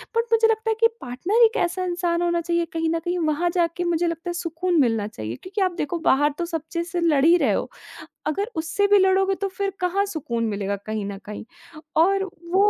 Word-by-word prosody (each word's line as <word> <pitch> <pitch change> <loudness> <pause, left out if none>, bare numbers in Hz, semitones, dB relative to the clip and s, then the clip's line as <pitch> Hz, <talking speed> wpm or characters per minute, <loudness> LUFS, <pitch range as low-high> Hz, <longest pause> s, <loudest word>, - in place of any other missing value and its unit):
But 460 - +3
मुझे 450 0 +5
लगता 450 0 0
है 445 - +2
कि 460 - +6
पार्टनर 345 - +1
एक 445 - +2
कैसा 350 +2 -1
इंसान 345 -1 -1
होना 345 -1 +1
चाहिए 340 0 0
कहीं 325 0 0
न 330 - 0
कहीं 350 +2 -2
वहाँ 315 +3 +1
जाके 340 0 +1
मुझे 345 0 +1
लगता 335 +1 -4
है - - -2
सुकून 340 0 -1
मिलना 225 -4 +1
चाहिए, 110 - -6
क्योंकि 390 - -5
आप 370 -1 +2
देखो 335 +2 -2
बाहर 290 +2 +4
तो 345 - -2
सब 330 -2 -3
चीज़ 340 0 -2
से 350 +1 -3
लड़ 300 -5 +3
ही 335 +2 +7
रहे - - +2
हो। - - -2 0.6
अगर 400 +10 -2
उससे 335 +6 0
भी 410 - +6
लड़ोगे 385 0 +3
तो 395 - +1
फ़िर 390 +1 -3
कहाँ 365 +3 +1
सुकून 250 -11 -3
मिलेगा 200 -1 -2
कहीं 215 -1 -3
न 200 0 -5
कहीं 210 +1 -7 0.6
और 390 +1 +2 0.2
वो 400 +2 +5
345 Hz, 225 wpm, -23 LUFS, 310-380 Hz, 0.6 s, ही